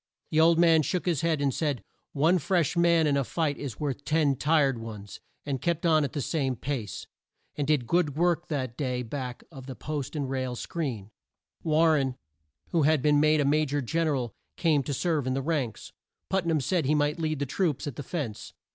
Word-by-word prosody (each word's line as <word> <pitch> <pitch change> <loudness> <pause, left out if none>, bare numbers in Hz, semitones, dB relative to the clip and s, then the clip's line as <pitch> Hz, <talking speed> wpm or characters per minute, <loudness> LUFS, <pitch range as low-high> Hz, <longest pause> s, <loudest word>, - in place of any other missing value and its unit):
The 155 - +2
old 165 +1 +5
man 165 -2 +5
shook 175 +5 -2
his 170 -6 +1
head, 165 -3 +1
and 140 -2 +1
said, 145 -9 -1 0.3
"One 160 +6 +3
fresh 170 0 +1
man 170 -1 +4
in 145 -2 +2
a 140 - +2
fight 150 +1 -1
is 135 -7 -6
worth 145 -1 -3
ten 150 -3 +2
tired 140 -3 +2
ones," 105 -3 -8 0.3
and 135 -3 -2
kept 170 0 -1
on 155 -2 +4
at 140 - -3
the 145 - -2
same 135 -4 -1
pace; 120 -4 -4 0.5
and 145 -2 -2
did 150 -5 +2
good 165 -1 +1
work 175 0 +1
that 130 -6 -3
day 125 -3 -2
back 125 0 -5
of 135 -4 -10
the 130 - -6
post 150 0 -5
and 145 -3 -2
rail 130 -1 -2
screen. 120 - -4 0.5
War 160 +1 +3
ren, 135 -4 0 0.5
who 165 - +2
had 150 -2 +3
been 150 -1 +4
made 155 0 +4
a - - +1
Ma 150 +2 +3
jor 145 0 -1
Gen 160 +6 0
er 150 - +1
al, 120 -5 -3 0.2
came 155 -4 +3
to 140 +2 -3
serve 155 -3 0
in 130 - 0
the 135 - -1
ranks. 140 -7 -2 0.4
Put 190 -3 +1
nam 160 -3 +2
said 170 +2 0
he 150 +3 +2
might 150 +2 +1
lead 155 -1 -1
the 140 - -1
troops 155 0 -1
at 145 -5 -5
the - - -5
fence. 135 -7 -5
145 Hz, 220 wpm, -27 LUFS, 130-160 Hz, 0.5 s, old